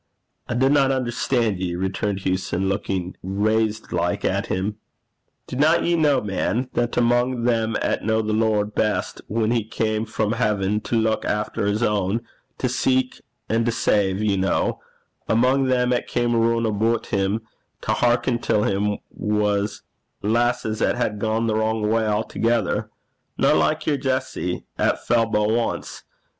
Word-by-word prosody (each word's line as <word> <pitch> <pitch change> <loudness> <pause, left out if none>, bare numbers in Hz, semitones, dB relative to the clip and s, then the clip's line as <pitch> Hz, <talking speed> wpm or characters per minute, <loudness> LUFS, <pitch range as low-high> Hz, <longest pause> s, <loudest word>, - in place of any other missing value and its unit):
'I 120 - -1
dinna 135 +2 +3
unnerstan' 120 -5 0
ye,' 90 -2 -2
returned 95 +2 -2
Hewson, 95 0 -1
looking 95 -2 -2
raised 110 +3 0
like 85 0 -1
at - - 0
him. 100 +3 -2 0.7
'Dinna 155 +6 +2
ye 175 - +1
ken, 150 -8 +2
man, 110 +6 -1
that 120 0 -1
amo' 120 +1 +2
them 115 -2 +1
'at - - 0
kent - - -7 0.2
the 110 - -1
Lord 105 -1 +1
best 105 -1 -1
whan 110 +1 0
he 120 -2 +1
cam 110 0 -1
frae 110 -1 -1
haiven 105 -3 0
to - - -1
luik 110 -1 +1
efter 105 -1 -1
his 105 +3 0
ain 105 0 +1 0.4
to 130 - 0
seek 130 +1 0 0.3
and 115 +1 +1
to - - +3
save, 100 -3 +1
ye 100 -3 +1
ken 95 - +1 0.6
amo' 130 +4 +3
them 125 -1 +2
'at 125 - -1
cam 120 -1 0
roon 115 0 +2
aboot 110 +2 +1
him 100 +3 +1 0.4
to - - -2
hearken 120 0 +2
till 105 -3 +1
'im, 105 +1 0
was 105 -1 -1 0.4
lasses 115 0 0
'at - - +2
had 105 -4 -1
gane 110 +1 0
the 110 - +1
wrang 110 0 0
gait 110 +1 +1
a'thegither, 110 0 0 0.5
no - - +4
like - - +1
your 150 -2 +1
bonnie - - -11
Jessie 130 -9 -2
'at - - +1
fell 115 -1 +3
but 105 -1 +1
ance. 115 0 -2
110 Hz, 155 wpm, -23 LUFS, 105-120 Hz, 0.7 s, no